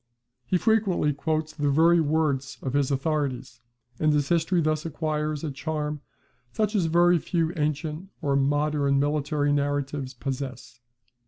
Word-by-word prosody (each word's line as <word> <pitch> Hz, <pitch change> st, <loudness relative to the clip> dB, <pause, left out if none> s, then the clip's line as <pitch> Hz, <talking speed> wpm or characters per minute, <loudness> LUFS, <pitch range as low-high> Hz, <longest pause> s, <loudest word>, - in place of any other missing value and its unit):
He 185 Hz, -, +2 dB
frequently 200 Hz, -8 st, +2 dB
quotes 155 Hz, +2 st, -2 dB
the 145 Hz, -2 st, 0 dB
very 165 Hz, +4 st, +5 dB
words 145 Hz, -3 st, 0 dB
of 130 Hz, -, -3 dB
his 140 Hz, -2 st, +2 dB
authorities: 135 Hz, -4 st, -2 dB, 0.4 s
and 155 Hz, -1 st, +3 dB
his 145 Hz, -2 st, +1 dB
history 170 Hz, +1 st, +2 dB
thus 155 Hz, -1 st, 0 dB
acquires 155 Hz, -1 st, -2 dB
a 155 Hz, -, -2 dB
charm 150 Hz, 0 st, -3 dB, 0.5 s
such 215 Hz, -1 st, 0 dB
as 195 Hz, -6 st, +2 dB
very 175 Hz, +1 st, +4 dB
few 165 Hz, 0 st, -1 dB
ancient 155 Hz, +3 st, -2 dB
or 140 Hz, -4 st, 0 dB
modern 145 Hz, 0 st, +2 dB
military 145 Hz, 0 st, 0 dB
narratives 145 Hz, -2 st, -2 dB
possess. 130 Hz, -2 st, -6 dB
150 Hz, 140 wpm, -26 LUFS, 140-160 Hz, 0.5 s, very